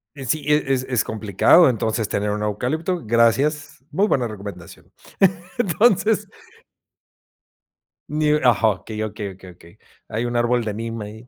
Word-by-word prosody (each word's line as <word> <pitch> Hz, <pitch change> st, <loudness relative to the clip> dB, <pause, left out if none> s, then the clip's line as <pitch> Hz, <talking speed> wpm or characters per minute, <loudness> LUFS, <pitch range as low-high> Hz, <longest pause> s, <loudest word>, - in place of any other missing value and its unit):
Eh, 135 Hz, -2 st, -8 dB
sí, 150 Hz, +4 st, -1 dB
es 150 Hz, 0 st, +3 dB
es 135 Hz, -2 st, 0 dB
es 120 Hz, -3 st, +1 dB
complicado 110 Hz, -, +4 dB
entonces, 110 Hz, -2 st, -1 dB
tener 105 Hz, +1 st, -1 dB
un 105 Hz, 0 st, -3 dB
eucalipto. 155 Hz, -, -2 dB
Gracias. 130 Hz, +7 st, +1 dB
Muy 200 Hz, +3 st, +2 dB
buena 125 Hz, -, +1 dB
recomendación. 100 Hz, -5 st, -10 dB, 0.7 s
Entonces. 210 Hz, 0 st, +2 dB, 1.8 s
Ni 150 Hz, 0 st, +1 dB
ajá. 125 Hz, -6 st, +3 dB
Okey, 105 Hz, +3 st, -4 dB
okey, 105 Hz, -1 st, -5 dB
okey, 95 Hz, 0 st, -14 dB
okey. 85 Hz, +2 st, -19 dB, 0.3 s
Hay 115 Hz, +2 st, -3 dB
un 120 Hz, 0 st, -2 dB
árbol 120 Hz, 0 st, +1 dB
de 110 Hz, -2 st, -3 dB
neem 115 Hz, +1 st, -5 dB
ahí, 110 Hz, +3 st, -10 dB
120 Hz, 145 wpm, -21 LUFS, 105-150 Hz, 1.8 s, complicado